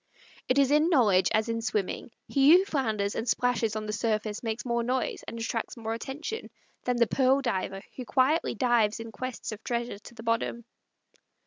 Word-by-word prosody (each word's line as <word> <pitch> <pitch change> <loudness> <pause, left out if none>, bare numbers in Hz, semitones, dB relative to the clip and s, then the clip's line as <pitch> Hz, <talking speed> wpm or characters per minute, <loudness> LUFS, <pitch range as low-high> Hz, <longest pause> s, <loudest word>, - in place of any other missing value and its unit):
It 255 - +3
is 280 -1 +4
in 305 +3 +4
knowledge 205 - +4
as 220 +1 +2
in 230 0 -2
swimming: 210 -2 -2 0.2
he 280 +5 +6
who 380 - +1
flounders 220 - -1
and 225 - -3
splashes 235 -3 +1
on 215 0 -3
the 210 - -3
surface 215 -1 -1
makes 225 +1 -3
more 235 -1 0
noise, 250 +2 -1
and 230 - -6
attracts 230 +1 -3
more 225 -1 -3
attention, 295 - -5 0.4
than 250 -1 +1
the 235 - +5
pearl 265 +3 +3
diver 195 -6 -2
who 255 - -5
quietly 270 +5 +2
dives 230 -3 +2
in 230 0 -7
quest 255 0 -5
of 215 0 -8
treasures 235 -4 -3
to 235 - -13
the 225 - -10
bottom. 230 0 -1
235 Hz, 190 wpm, -28 LUFS, 220-255 Hz, 0.4 s, he